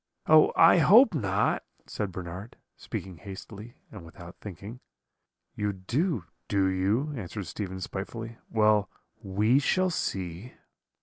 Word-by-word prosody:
"'Oh! 155 Hz, 0 st, +6 dB
I 165 Hz, +2 st, +7 dB
hope 215 Hz, -, +7 dB
not,' 105 Hz, -, 0 dB, 0.2 s
said 105 Hz, -2 st, -4 dB
Bernard, 90 Hz, +4 st, -8 dB, 0.2 s
speaking 95 Hz, -3 st, -7 dB
hastily 100 Hz, +6 st, -10 dB, 0.2 s
and -, -, -10 dB
without 85 Hz, +1 st, -12 dB
thinking. 105 Hz, +5 st, -9 dB, 0.7 s
"'You 105 Hz, -1 st, -2 dB
do, 115 Hz, -, -1 dB, 0.2 s
do 100 Hz, -2 st, +2 dB
you?' 100 Hz, +10 st, 0 dB
answered 105 Hz, -3 st, -6 dB
Stephen 95 Hz, +1 st, -5 dB
spitefully; 115 Hz, +5 st, -6 dB
'well, 105 Hz, -2 st, +3 dB, 0.3 s
we 105 Hz, +5 st, +2 dB
shall 185 Hz, +6 st, +1 dB
see.' 95 Hz, -, -4 dB
105 Hz, 120 wpm, -28 LUFS, 95-120 Hz, 0.7 s, I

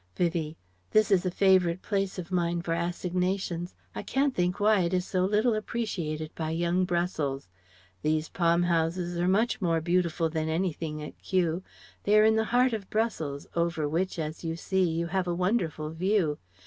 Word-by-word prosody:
Vivie: 165 Hz, -2 st, -1 dB, 0.3 s
"This 215 Hz, -1 st, +3 dB
is 185 Hz, -1 st, +3 dB
a -, -, +2 dB
favourite 185 Hz, -1 st, +3 dB
place 195 Hz, -2 st, -1 dB
of 180 Hz, 0 st, -6 dB
mine 170 Hz, -1 st, 0 dB
for 165 Hz, -, -1 dB
assignations. 175 Hz, +1 st, -2 dB, 0.2 s
I -, -, -4 dB
can't 275 Hz, 0 st, 0 dB
think 180 Hz, -2 st, 0 dB
why 210 Hz, 0 st, +4 dB
it 175 Hz, 0 st, +1 dB
is 180 Hz, -1 st, 0 dB
so 185 Hz, -2 st, 0 dB
little 215 Hz, +4 st, +2 dB
appreciated 180 Hz, -9 st, -3 dB
by 160 Hz, -1 st, -3 dB
young 175 Hz, +3 st, +1 dB
Brussels. 170 Hz, -, -1 dB, 0.5 s
These 155 Hz, 0 st, 0 dB
palm 170 Hz, 0 st, +2 dB
houses 175 Hz, +1 st, 0 dB
are 175 Hz, -, +1 dB
much 220 Hz, +4 st, +2 dB
more 165 Hz, -3 st, +2 dB
beautiful 170 Hz, 0 st, +1 dB
than 160 Hz, 0 st, -2 dB
anything 160 Hz, -2 st, -2 dB
at 150 Hz, -, -9 dB
Kew; 175 Hz, -2 st, 0 dB, 0.4 s
they 210 Hz, +1 st, +3 dB
are 215 Hz, -, +6 dB
in 220 Hz, 0 st, +5 dB
the 220 Hz, 0 st, +2 dB
heart 245 Hz, +2 st, +3 dB
of 205 Hz, -4 st, -4 dB
Brussels, 165 Hz, -11 st, -2 dB
over 170 Hz, -3 st, 0 dB
which, 175 Hz, +6 st, -1 dB
as 155 Hz, 0 st, -4 dB
you 165 Hz, -1 st, -2 dB
see, 185 Hz, +1 st, +1 dB
you 165 Hz, +1 st, -1 dB
have 180 Hz, +1 st, -1 dB
a 175 Hz, -, 0 dB
wonderful 175 Hz, -5 st, -1 dB
view. 170 Hz, -2 st, +1 dB
175 Hz, 180 wpm, -28 LUFS, 165-195 Hz, 0.5 s, are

